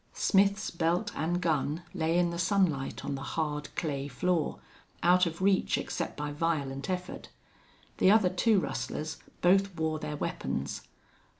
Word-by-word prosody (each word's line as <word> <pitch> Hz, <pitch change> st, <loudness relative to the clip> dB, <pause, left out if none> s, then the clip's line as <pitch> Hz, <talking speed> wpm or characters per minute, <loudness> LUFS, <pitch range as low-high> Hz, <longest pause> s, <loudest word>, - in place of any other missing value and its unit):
Smith's 200 Hz, +1 st, +2 dB
belt 170 Hz, +5 st, 0 dB
and 175 Hz, +3 st, -1 dB
gun 155 Hz, -1 st, 0 dB
lay 165 Hz, -2 st, +1 dB
in 175 Hz, -1 st, +2 dB
the 170 Hz, -, -4 dB
sunlight 175 Hz, -7 st, +1 dB
on 140 Hz, -, -2 dB
the 135 Hz, -, -4 dB
hard, 150 Hz, 0 st, -2 dB
clay 140 Hz, -4 st, -2 dB
floor, 150 Hz, -, 0 dB, 0.5 s
out 180 Hz, +1 st, +5 dB
of 170 Hz, +3 st, -5 dB
reach 195 Hz, -1 st, +3 dB
except -, -, -4 dB
by 150 Hz, 0 st, -3 dB
violent 145 Hz, -3 st, -2 dB
effort. 180 Hz, 0 st, -4 dB, 0.7 s
The -, -, +5 dB
other 205 Hz, -3 st, +5 dB
two 200 Hz, +3 st, +3 dB
rustlers 155 Hz, +2 st, -3 dB, 0.2 s
both 195 Hz, +1 st, +3 dB
wore 160 Hz, -1 st, -1 dB
their 150 Hz, -1 st, -4 dB
weapons. -, -, -3 dB
170 Hz, 145 wpm, -30 LUFS, 150-185 Hz, 0.7 s, out